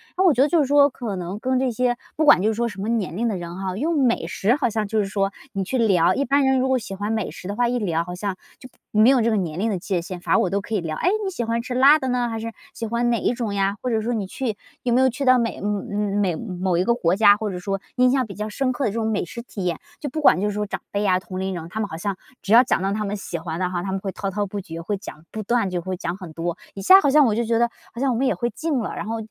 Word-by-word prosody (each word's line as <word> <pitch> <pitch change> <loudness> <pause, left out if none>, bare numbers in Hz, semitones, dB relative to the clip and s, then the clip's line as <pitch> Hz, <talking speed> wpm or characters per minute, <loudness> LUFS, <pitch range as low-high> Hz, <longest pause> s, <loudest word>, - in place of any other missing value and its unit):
然 375 - +2
后 - - +3
我 345 - +6
觉 260 - +2
得 280 - +5
就 335 +2 +2
是 - - +2
说 285 +1 +5
可 235 -6 -5
能 180 +2 -5
跟 255 +2 0
这 260 -1 +1
些 245 +1 0 0.2
不 310 - +1
管 180 - +7
就 205 - +2
是 - - 0
说 235 +2 0
什 210 - -8
么 205 - -3
年 215 -8 -1
龄 235 +2 0
的 220 - -1
人 175 0 -7
哈， 190 -1 -3
用 305 +4 0
美 235 -8 +1
食 205 +6 +1
好 285 -4 0
像 215 -1 -2
就 215 +1 0
是 205 - +1
说 195 0 -1 0.2
你 195 -1 -1
去 255 +8 -2
聊， 195 -8 +4
一 280 - 0
般 280 +3 +3
人 265 0 +3
如 260 - +1
果 260 0 +2
喜 205 -5 -6
欢 205 +2 -3
美 220 -3 -1
食 180 - -9
的 200 - -3
话， 240 +1 +2
一 245 +1 0
聊 170 -6 0
好 180 +1 -7
像 195 +1 -3 0.2
就 255 - -12 0.2
没 215 +3 +5
有 265 -2 +4
这 230 - +2
个 220 - +1
年 175 -5 -2
龄 220 +3 +1
的 200 - -1
界 180 0 -1
限， 180 +1 -7
反 - - 0
而 - - +5
我 185 - +1
都 200 +2 -1
可 215 +2 -4
以 200 - 0
聊。 160 -2 -4
哎， - - +2 0.2
你 - - 0
喜 345 -10 -3
欢 230 0 -1
吃 250 +1 -5
辣 275 +5 +6
的 265 - -3
呢， 245 -1 0
还 225 -1 -4
是 230 +1 -5 0.2
喜 230 - -5
欢 235 +2 0
哪 235 -1 +1
一 - - +1
种 235 -4 -3
呀， 195 0 +1
或 255 - -2
者 225 -2 +1
说 235 +3 -1
你 215 -4 -2
去， 250 0 -3 0.3
有 245 - +1
没 250 - +4
有 260 - +5
去 265 +3 -4
到 255 0 +6
美 235 -1 -1
呃， 205 - -3
美 205 -2 -1
嗯， 185 0 -6
某 185 -2 +1
一 180 - +2
个 235 - +3
国 180 -7 +1
家， 205 0 +6
或 215 0 -3
者 180 - -5
说 195 +2 -2 0.2
印 250 0 +4
象 260 -1 +2
比 205 - -9
较 210 +1 -4
深 255 +4 -1
刻 265 +2 -2
的 215 - +1
这 - - -8
种 220 -1 0
美 205 - -1
食 235 +7 -7
体 205 -5 -6
验？ 170 -3 0 0.2
就 290 - -4
不 310 +4 -4
管 285 - +5
就 205 - +1
是 210 - -2
说 210 +1 -2
长 200 - -4
辈 200 - -1
呀 185 -2 +3
同 185 0 -7
龄 190 0 -2
人， 165 -2 -6
他 215 - -5
们 215 - -1
好 160 - -6
像 195 +3 -2 0.3
只 205 - 0
要 240 +2 +9
讲 255 - 0
到 195 +1 0
他 215 +1 -2
们 200 +1 -2
喜 175 - -5
欢 165 0 -5
的 180 -1 0
哈， 175 -1 -3
他 190 - -3
们 195 - -1
会 195 0 -4
滔 195 +1 -4
滔 205 +2 -1
不 200 +1 -5
绝， 165 -2 -8
会 200 +4 -2
讲， 165 -5 -11
不 220 - -5
断 230 -1 +1
就 180 -1 -2
会 185 +2 -4
讲 175 -1 -3
很 180 -5 -9
多， 170 +2 -3 0.2
一 195 - -7
下 380 - +8
好 285 - +2
像 295 +1 +6
我 225 - +2
就 235 - +1
觉 230 0 +1
得 235 0 +3 0.2
好 235 - -8
像 270 -1 +2
我 - - -1
们 265 +2 +1
也 - - +1
会 240 - -1
近 310 +3 -1
了， 220 - -4
然 - - -4
后 225 +1 -3
215 Hz, 365 characters per minute, -23 LUFS, 190-245 Hz, 0.3 s, 要